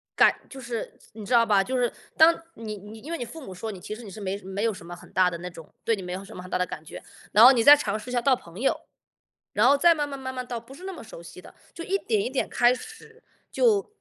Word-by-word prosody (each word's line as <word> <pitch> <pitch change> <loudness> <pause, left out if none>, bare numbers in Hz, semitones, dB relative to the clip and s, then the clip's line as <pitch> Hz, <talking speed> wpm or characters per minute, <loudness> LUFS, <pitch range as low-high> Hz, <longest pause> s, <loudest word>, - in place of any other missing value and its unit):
感 - - +5
就 270 - -10
是 235 -2 -6 0.2
你 215 -1 -9
知 245 - -2
道 230 -1 +6
吧， 205 -3 +4
就 255 +5 -2
是 245 -2 +1 0.3
当 325 +1 +7 0.2
你 215 -2 -6
你 210 +3 -11
因 305 +8 -9
为 335 - -2
你 245 - -4
父 300 +5 -10
母 190 - -8
说 220 +5 -6
你 190 - -9
其 210 - -7
实 230 +3 -9
你 205 - -9
是 215 - -10
没 195 0 -3
什 190 - -14
没 195 +2 -3
有 230 -2 +1
什 185 - -11
么 175 0 -8
很 - - -16
大 185 0 +4
的 170 - -6
那 180 +1 -6
种 165 -2 -13
对 230 - +2
你 - - -6
没 180 -1 -5
有 190 +2 -5
什 - - -12
么 - - -7
很 185 - -11
大 - - 0
的 180 - +1
感 160 - -8
觉。 - - -10 0.3
然 215 - +7
后 260 - +11
你 245 -4 +2
再 290 +3 +10
尝 215 -8 -2
试 250 - -10
一 - - -5
下 245 - +2
到 270 +1 +4
朋 170 -2 -13
友， 270 - +1 0.8
然 215 +4 +4
后 280 +2 +5
再 335 +3 +6
慢 295 -2 -1
慢 280 -1 -7
慢 260 -1 -6
慢 255 -1 -5
到 240 -2 -4
不 260 +4 -14
是 360 - -12
那 385 - -5
么 345 - -9
熟 170 -6 -11
悉 170 - -12
的。 - - -15 0.2
就 335 - -8
一 390 - 0
点 425 +1 0
一 - - -2
点 265 +1 -1
开 245 +1 +4
始， 445 - -12 0.3
就 430 -3 +2
230 Hz, 340 characters per minute, -26 LUFS, 195-280 Hz, 0.8 s, 后